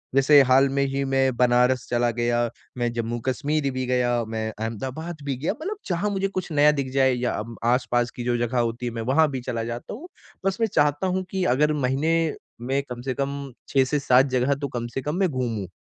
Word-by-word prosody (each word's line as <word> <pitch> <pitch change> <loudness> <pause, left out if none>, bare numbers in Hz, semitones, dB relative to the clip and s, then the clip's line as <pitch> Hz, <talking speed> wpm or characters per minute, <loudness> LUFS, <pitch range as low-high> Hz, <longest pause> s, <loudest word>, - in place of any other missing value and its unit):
जैसे 140 +1 +7
हाल 130 +2 +5
में 140 +1 +1
ही 135 0 -1
मैं 135 -1 +1
बनारस 125 +1 +3
चला 120 0 +2
गया, 120 0 0 0.3
मैं 120 -1 0
जम्मू 120 0 -2
कश्मीर 145 +2 0
भी 130 0 -3
गया, 120 -2 +1
मैं 110 0 -3
अहमदाबाद 135 +9 -4
भी 140 -2 -1
गया 150 - -1
मतलब 400 +5 -3
जहाँ 185 +3 0
मुझे 195 -1 0
कुछ 185 -3 -5
नया 150 0 +5
दिख 130 -1 -2
जाए 130 -1 +4
या 125 0 -1 0.4
आस-पास 120 -1 +1
की 120 - -5
जो 120 0 0
जगह 120 +1 0
होती 120 +1 -1
है 120 - -2
मैं 115 - -4
वहाँ 155 +1 +4
भी 130 -2 -4
चला 115 -2 -3
जाता 120 - -5
हूँ। 305 +11 -9 0.4
बस 195 0 +1
मैं 225 - +3
चाहता 145 +5 +2
हूँ 185 +1 -1
कि 190 -1 -1
अगर 150 +3 +2
महीने 140 +3 0 0.5
में 135 +3 0
कम 120 0 -6
से 130 0 -2
कम 140 0 -4 0.2
6 135 -1 +4
से 145 +3 0
7 130 -1 +4
जगह 130 +2 +2
तो 140 0 -4
कम 120 -2 -4
से 135 - -1
कम 150 +4 -3
मैं 190 -3 +2
घूमूँ। 115 - -2
130 Hz, 220 wpm, -24 LUFS, 120-145 Hz, 0.5 s, जैसे